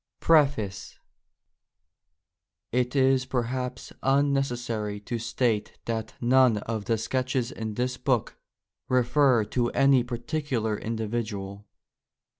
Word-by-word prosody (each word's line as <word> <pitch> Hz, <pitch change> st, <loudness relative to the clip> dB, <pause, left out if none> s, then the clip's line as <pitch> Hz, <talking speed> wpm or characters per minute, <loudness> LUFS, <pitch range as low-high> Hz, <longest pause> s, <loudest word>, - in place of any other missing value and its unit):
PREFACE 135 Hz, -12 st, +2 dB, 1.7 s
It 125 Hz, +2 st, 0 dB
is 130 Hz, -1 st, +3 dB
perhaps 125 Hz, 0 st, -3 dB
unnecessary 125 Hz, -6 st, 0 dB
to 115 Hz, +3 st, -4 dB
state 115 Hz, -2 st, -1 dB
that 110 Hz, -1 st, -3 dB
none 125 Hz, -2 st, +4 dB
of 110 Hz, 0 st, -4 dB
the 115 Hz, -, +1 dB
sketches 130 Hz, +1 st, -1 dB
in 110 Hz, -2 st, -5 dB
this 125 Hz, +2 st, -1 dB
book 125 Hz, -3 st, 0 dB, 0.5 s
refer 125 Hz, -1 st, +3 dB
to 120 Hz, +2 st, 0 dB
any 135 Hz, -2 st, +4 dB
particular 120 Hz, -2 st, -2 dB
individual. 105 Hz, -3 st, -4 dB
120 Hz, 95 wpm, -27 LUFS, 110-130 Hz, 1.7 s, none